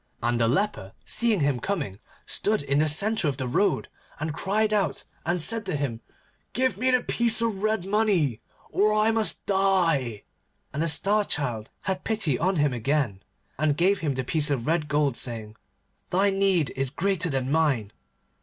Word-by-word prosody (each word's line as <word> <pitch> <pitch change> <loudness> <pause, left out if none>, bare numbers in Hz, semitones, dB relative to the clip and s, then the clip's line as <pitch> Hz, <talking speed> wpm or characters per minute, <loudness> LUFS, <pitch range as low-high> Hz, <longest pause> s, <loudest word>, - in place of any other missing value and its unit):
And 120 0 +1
the 115 - +3
leper 135 - -1
seeing 225 -5 +1
him 140 -3 +1
coming, 140 - -3 0.3
stood 210 -7 0
in 140 0 +1
the 155 - +3
centre 200 +4 +2
of 140 - -1
the 130 - -2
road, 195 +10 +1 0.3
and 155 0 -3
cried 215 +6 0
out, 205 -2 0 0.2
and 175 +1 +1
said 225 +7 +2
to 185 - -1
him, 130 -6 -3 0.5
'Give 260 -4 +1
me 255 +6 0
the 250 -1 +3
piece 235 -1 +2
of 225 -4 -1
red 215 -3 0
money, 190 - +1 0.3
or 210 +1 +2
I 215 +1 +3
must 225 -1 +1
die,' 170 - +1 0.5
and 150 - -2
the 165 - +1
Star 205 +6 +3
Child 120 - -2
had 190 -1 -3
pity 200 - 0
on 185 +4 +1
him 145 -4 +2
again, 120 -4 -1 0.4
and 150 -1 +1
gave 190 +3 +3
him 145 -4 -1
the 130 - -2
piece 150 +3 0
of 130 -5 -1
red 160 -1 0
gold, 145 -3 +1
saying, 110 -3 -3 0.5
'Thy 195 +2 +2
need 195 -5 +1
is 135 0 -1
greater 185 +3 -1
than 135 -2 -1
mine. 140 -10 +1
165 Hz, 180 wpm, -26 LUFS, 135-200 Hz, 0.5 s, the